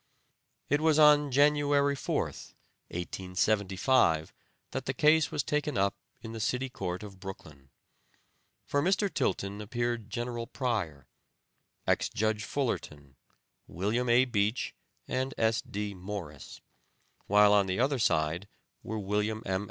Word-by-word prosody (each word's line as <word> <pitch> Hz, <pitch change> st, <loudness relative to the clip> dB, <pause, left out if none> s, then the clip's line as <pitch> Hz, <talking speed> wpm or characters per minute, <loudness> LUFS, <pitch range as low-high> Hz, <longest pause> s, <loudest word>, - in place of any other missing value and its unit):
It 145 Hz, +2 st, +1 dB
was 155 Hz, -1 st, +4 dB
on 150 Hz, -1 st, +6 dB
January 145 Hz, +1 st, +3 dB
4th, 130 Hz, -, -3 dB, 0.3 s
1875, 95 Hz, -, +1 dB, 0.4 s
that -, -, -4 dB
the 130 Hz, -, -1 dB
case 155 Hz, +1 st, +4 dB
was 145 Hz, -, -1 dB
taken 150 Hz, -2 st, -1 dB
up 100 Hz, +1 st, +2 dB, 0.3 s
in 115 Hz, -, -6 dB
the 115 Hz, -, -6 dB
City 125 Hz, +4 st, -1 dB
Court 90 Hz, -5 st, -4 dB
of 100 Hz, -2 st, -10 dB
Brooklyn. 75 Hz, -8 st, -10 dB, 1.0 s
For 145 Hz, -, +1 dB
Mr. 195 Hz, +4 st, +1 dB
Tilton 100 Hz, -8 st, -1 dB
appeared 120 Hz, 0 st, -2 dB
General 120 Hz, +1 st, -4 dB
Pryor, 100 Hz, -, -2 dB, 0.8 s
ex -, -, +1 dB
Judge 110 Hz, 0 st, -1 dB
Fullerton, 75 Hz, -, -3 dB, 0.5 s
William 110 Hz, +8 st, -1 dB
A. 120 Hz, +2 st, +5 dB
Beach 110 Hz, -1 st, 0 dB, 0.3 s
and 130 Hz, +2 st, -2 dB
S. 115 Hz, 0 st, +2 dB
D. 105 Hz, 0 st, -4 dB
Morris; 90 Hz, -6 st, -8 dB, 0.7 s
while 105 Hz, 0 st, +6 dB
on 100 Hz, -2 st, +4 dB
the 95 Hz, +2 st, -1 dB
other 135 Hz, +1 st, +2 dB
side 85 Hz, -2 st, +1 dB, 0.3 s
were 110 Hz, -, -5 dB
William 105 Hz, +2 st, -1 dB
M. 95 Hz, -1 st, 0 dB
110 Hz, 130 wpm, -30 LUFS, 95-130 Hz, 1.0 s, on